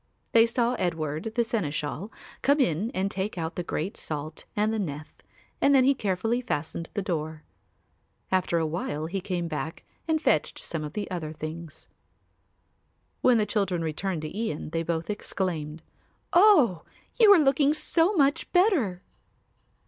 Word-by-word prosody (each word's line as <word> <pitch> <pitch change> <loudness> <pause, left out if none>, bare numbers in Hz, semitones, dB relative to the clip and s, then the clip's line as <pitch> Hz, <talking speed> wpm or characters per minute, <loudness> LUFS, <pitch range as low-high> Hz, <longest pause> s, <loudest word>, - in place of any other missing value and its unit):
They 230 0 +6
saw 235 +1 +1
Edward, 165 +2 -2
the 240 - +3
seneschal, 170 -3 -3 0.3
come 285 +2 +3
in 205 - +1
and 190 +1 0
take 195 0 -3
out 160 0 -3
the - - -2
great 175 +2 -3
salt 155 +1 -5
and 215 +1 +1
the 220 - -1
nef 155 -5 -5 0.5
and 280 0 +5
then 260 - +6
he 275 +2 +5
carefully 225 +1 -1
fastened 165 -6 -3
the 200 - -1
door. 160 -4 -3 0.9
After 185 -2 +2
a 165 - +1
while 155 -1 -3
he 190 +4 -3
came 180 -2 -2
back 160 0 -5 0.2
and 320 -1 +2
fetched - - +1
some 160 -2 -5
of 150 0 -6
the 210 - -3
other 165 -4 -3
things. 155 0 -8 1.3
When 250 -2 +5
the 215 - +2
children 195 -6 0
returned 165 +1 -2
to 155 - -6
Ian, 205 -9 -3
they 165 - -1
both 165 +3 -2
exclaimed, 165 -6 -3 0.5
"Oh, 325 - +6 0.4
you 435 -3 +8
are - - +7
looking 280 0 +3
so 335 +4 +2
much 285 -3 +2
better." 315 - +2
185 Hz, 155 wpm, -27 LUFS, 160-235 Hz, 1.3 s, you